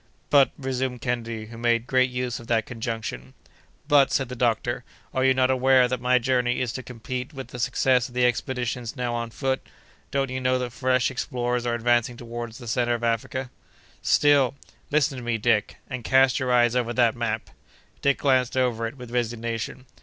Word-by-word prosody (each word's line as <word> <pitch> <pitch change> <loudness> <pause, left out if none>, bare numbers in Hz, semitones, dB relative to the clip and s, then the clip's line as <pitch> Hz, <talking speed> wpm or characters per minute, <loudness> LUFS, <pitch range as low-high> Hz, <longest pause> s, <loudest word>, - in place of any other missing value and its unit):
"But," 140 -2 +6
resumed 130 -2 -3
Kennedy, 115 -3 -3
who 115 +1 -11
made 120 -1 +2
great 130 0 +3
use 125 -1 -3
of 115 - -12
that 115 -2 +1
conjunction. 110 - -5 0.5
"But," 145 -3 +5
said 135 -3 0
the 125 - -5
doctor, 120 0 0 0.3
"are 130 - +1
you 130 0 +4
not 130 0 +3
aware 130 -1 +4
that 125 0 -3
my 125 +1 +4
journey 125 -1 +1
is 125 -3 -1
to 130 - -4
compete 125 +3 -6
with 135 -1 -7
the 125 - -8
success 125 0 +2
of 125 - -16
the 125 0 +3
expeditions 125 0 -2
now 125 -2 -2
on 115 -1 -3
foot? 130 +2 -1 0.5
Don't 135 -2 -1
you 130 0 -3
know 130 0 +2
that 125 -2 -4
fresh 130 -1 +1
explorers 125 -2 -2
are 120 - +1
advancing 120 +1 +1
toward 120 -1 -6
the 120 0 -10
centre 120 +1 +1
of 120 - -6
Africa?" 120 +3 -1 0.5
"Still—" 140 -3 +4 0.3
"Listen 145 -3 +1
to - - -8
me, 120 -1 0
Dick, 105 -1 +1
and 130 -3 -5
cast 130 +1 +4
your 130 -1 -1
eyes 120 -1 +4
over 120 -1 0
that 120 -2 +3
map." 110 -2 -3 0.5
Dick 140 0 +3
glanced 130 -2 +2
over 120 -3 +1
it, 120 +5 -9
with 125 -2 -10
resignation. 115 0 -3
125 Hz, 190 wpm, -25 LUFS, 120-130 Hz, 0.5 s, But